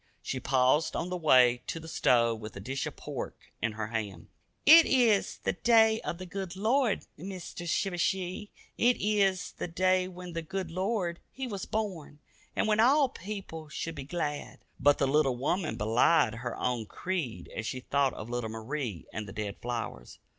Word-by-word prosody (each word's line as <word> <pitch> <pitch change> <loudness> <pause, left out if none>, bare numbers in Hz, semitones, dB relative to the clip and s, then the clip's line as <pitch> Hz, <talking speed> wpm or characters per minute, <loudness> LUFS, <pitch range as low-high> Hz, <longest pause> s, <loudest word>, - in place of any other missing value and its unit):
She 130 - -3
paused 130 +4 +2
on 175 - -2
the 180 - -2
way 125 -7 +5
to 165 - -3
the 160 - -10
stove 115 -7 +2
with 105 -1 -8
a - - -6
dish 130 +7 -3
of - - -7
pork - - -7
in 110 -1 0
her 105 0 -3
hand. 110 -4 -4 0.4
"It 320 +2 +9
eez 235 -6 +3
the - - +1
day 225 -1 +4
of 170 - -4
the 185 - -7
good 190 0 -5
Lord, 225 +3 +1
Meester 180 0 -7
Shivershee. 185 +3 -1 0.3
It 245 +1 +4
eez 200 -3 +1
the - - -3
day 185 +2 +2
when 180 -1 -9
the 165 - -2
good 180 +1 -4
Lord 185 -1 -1
He 265 - -5
was 200 -6 -4
born, 190 -9 -3 0.4
and - - +1
when 215 0 +2
all 270 +4 +5
people 195 - -7
should 165 +2 -4
be 145 -3 -6
glad." 150 -1 -4 0.2
But 145 0 +5
the 140 - +2
little 135 -2 +3
woman 155 +6 -1
belied 115 +4 +3
her 120 +1 -5
own 120 -3 -1
creed 170 - -4
as 115 - -3
she 130 - -4
thought 140 0 +1
of 110 - -7
little 120 -2 -3
Marie 115 - -4
and 105 -1 -4
the 95 - -8
dead 105 -2 -4
flowers. 115 - -5
165 Hz, 185 wpm, -30 LUFS, 125-195 Hz, 0.4 s, It